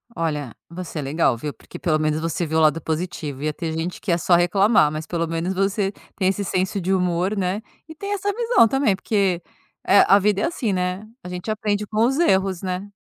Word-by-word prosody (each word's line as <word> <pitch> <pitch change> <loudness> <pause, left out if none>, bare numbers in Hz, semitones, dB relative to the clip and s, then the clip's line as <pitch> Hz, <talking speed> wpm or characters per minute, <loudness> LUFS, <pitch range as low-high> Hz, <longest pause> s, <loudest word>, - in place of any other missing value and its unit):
Olha, 150 -6 -2 0.2
você 170 -2 -6
é - - -1
legal, 140 -3 +1
viu? 145 +4 -5
Porque - - -12
pelo 155 -3 +1
menos 155 0 0
você 165 +1 -2
viu 160 0 -1
o 160 - +4
lado 155 +1 +3
positivo, 155 -4 -4
ia 155 0 0
ter 165 -1 -4
gente 165 +3 -4
que 190 - -1
ia 170 - +3
só 175 +1 +3
reclamar, 175 -1 +4
mas 155 +1 -5
pelo 170 -1 -1
menos 165 +3 -2
você 195 +1 0 0.3
tem 190 -2 +1
esse 195 +1 0
senso 190 +1 -1
de 190 +2 0
humor, 180 +2 +1
né. 190 +3 -1 0.3
E 315 - -10
tem 400 +5 -4
essa 405 0 -1
visão 465 - +4
também 250 -4 +2
porque, 195 -3 0 0.5
eh, 200 - +7
a 200 - +7
vida 205 0 +1
é - - +2
assim, 235 - -1
né, 180 +3 -2 0.2
a 180 - -7
gente 180 +4 -6
aprende 210 -1 -1
com 220 +1 +2
os 270 +4 +1
erros, 190 - +2
né? 190 +2 -4
185 Hz, 225 wpm, -22 LUFS, 165-205 Hz, 0.5 s, eh